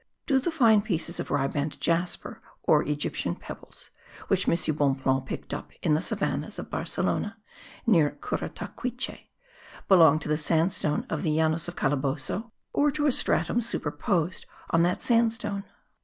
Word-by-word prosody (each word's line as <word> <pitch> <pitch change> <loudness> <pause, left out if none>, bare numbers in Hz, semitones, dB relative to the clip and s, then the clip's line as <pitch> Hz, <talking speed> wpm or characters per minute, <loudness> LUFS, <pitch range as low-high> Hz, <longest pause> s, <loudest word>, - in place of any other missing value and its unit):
Do 270 -3 +3
the 285 - -1
fine 230 -10 +5
pieces 175 -5 -1
of - - -4
riband 145 +1 -1
jasper, 170 +1 -1 0.2
or - - +5
Egyptian 150 0 -2
pebbles, - - -10 0.4
which - - +2
M. - - +4 0.2
Bonpland 135 -2 +1
picked - - -5
up - - -5
in 155 - +3
the 155 - +2
savannahs - - -2
of - - -7
Barcelona 215 +2 -1 0.5
(near 165 -11 +3
Curataquiche), 250 0 -4 0.6
belong 165 -6 +7
to 155 - -5
the 150 0 +1
sandstone 160 -1 +1
of 160 - -2
the 155 -1 +1
Llanos 160 +1 +1
of 175 - -6
Calabozo 145 - -1 0.2
or 295 +1 +3
to 295 +1 -1
a 290 - +5
stratum 240 -1 +1
superposed 185 -6 -2 0.2
on 165 - +4
that 175 +1 +1
sandstone? 225 -4 +1
170 Hz, 145 wpm, -27 LUFS, 150-225 Hz, 0.6 s, belong